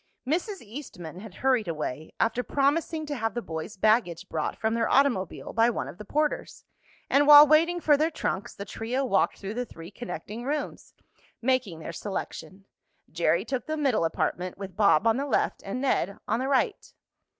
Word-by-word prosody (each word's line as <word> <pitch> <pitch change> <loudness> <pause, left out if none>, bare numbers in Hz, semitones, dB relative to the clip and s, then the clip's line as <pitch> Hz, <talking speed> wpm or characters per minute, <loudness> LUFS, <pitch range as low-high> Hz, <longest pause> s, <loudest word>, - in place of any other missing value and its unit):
Mrs. 360 - -1
Eastman 205 - -9
had 205 -2 -11
hurried 250 -6 +3
away, 155 -2 -4
after 230 +2 +1
promising 305 +4 0
to 295 -1 -4
have 225 -2 -2
the 240 - -1
boys' 160 +5 -6
baggage 195 -4 +2
brought 155 -1 -2
from 220 0 0
their 230 0 0
automobile 250 -10 +1
by 230 +1 +4
one 240 - -3
of 175 - -10
the 210 - -8
porters, 300 +6 -2 0.4
and 285 +1 +3
while 295 0 +11
waiting 330 +4 +4
for 305 -3 +4
their 310 +3 +2
trunks 205 - -3
the 200 - -7
trio 245 +6 -2
walked 200 -6 +1
through 200 +1 -6
the 245 +2 -2
three 170 -6 -11
connecting 215 0 -7
rooms, 290 +3 -4 0.4
making 245 -8 0
their 160 +1 -7
selection. 195 +1 -6 0.5
Jerry 170 +3 +1
took 260 -2 -3
the 310 0 -2
middle 270 - +1
apartment, 180 +2 -2
with 195 -2 -8
Bob 200 -3 +4
on 225 +1 +4
the 280 +1 -2
left - - 0
and 200 +6 -4
Ned 200 -8 0
on - - +1
the 260 - -1
right. 280 - 0
230 Hz, 185 wpm, -27 LUFS, 190-280 Hz, 0.5 s, while